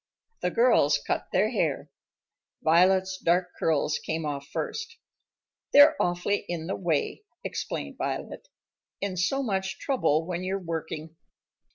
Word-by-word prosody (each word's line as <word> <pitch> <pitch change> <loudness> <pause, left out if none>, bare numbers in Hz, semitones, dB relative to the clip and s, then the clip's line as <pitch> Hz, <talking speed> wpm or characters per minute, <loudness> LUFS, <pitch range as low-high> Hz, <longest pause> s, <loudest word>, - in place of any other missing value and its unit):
The - - +1
girls 180 - +4
cut - - -1
their - - +2
hair. - - -1 0.7
Violet's 185 +3 +4
dark 180 +1 +2
curls 155 -1 +1
came 160 0 -3
off 140 -1 -4
first. 455 0 -4 0.8
"They're 290 +2 +8
awfully 175 +3 +1
in 170 -2 -3
the 190 - -2
way," 170 - -1 0.2
explained - - -4
Violet, - - -4 0.5
"and 190 -3 -3
so 270 +9 +1
much 190 -4 -2
trouble 165 - +1
when 180 0 -3
you're 190 +1 -1
working." 160 -2 -5
180 Hz, 130 wpm, -27 LUFS, 160-195 Hz, 0.8 s, They're